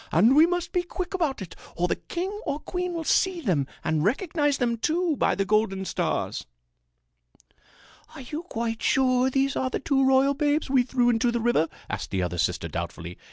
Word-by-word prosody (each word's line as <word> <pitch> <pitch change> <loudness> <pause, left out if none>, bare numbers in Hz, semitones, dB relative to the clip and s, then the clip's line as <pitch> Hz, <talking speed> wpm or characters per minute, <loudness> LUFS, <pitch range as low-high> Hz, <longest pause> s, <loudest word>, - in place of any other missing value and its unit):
"And 220 +11 +5
we 315 +3 +7
must 355 -1 -2
be 360 - +1
quick 360 +2 -5
about 310 - -1
it 180 - -11 0.2
or 175 +1 +1
the - - 0
king 365 +3 -4
or 285 - -2
queen 360 +2 -3
will 330 - -3
see 370 +3 +2
them 175 - 0 0.2
and 155 -1 0
recognize 290 - +1
them, 235 -2 0
too, 330 +6 0
by - - +1
the 195 - 0
golden 205 -2 +1
stars." - - -2 1.7
"Are - - -8
you 295 +5 -5
quite 230 -9 -4
sure 255 -1 +3
these 270 +1 +1
are 260 - 0
the - - -2
two 270 -1 +1
royal 265 +1 +4
babes 290 0 0
we 265 -2 +5
threw 245 -1 +2
into 235 +1 +1
the 235 - -1
river?" 225 -9 +2 0.2
asked 100 0 -4
the 95 -2 -1
other 90 0 -3
sister 85 -1 0
doubtfully. 85 +1 -6
260 Hz, 195 wpm, -26 LUFS, 195-310 Hz, 1.7 s, we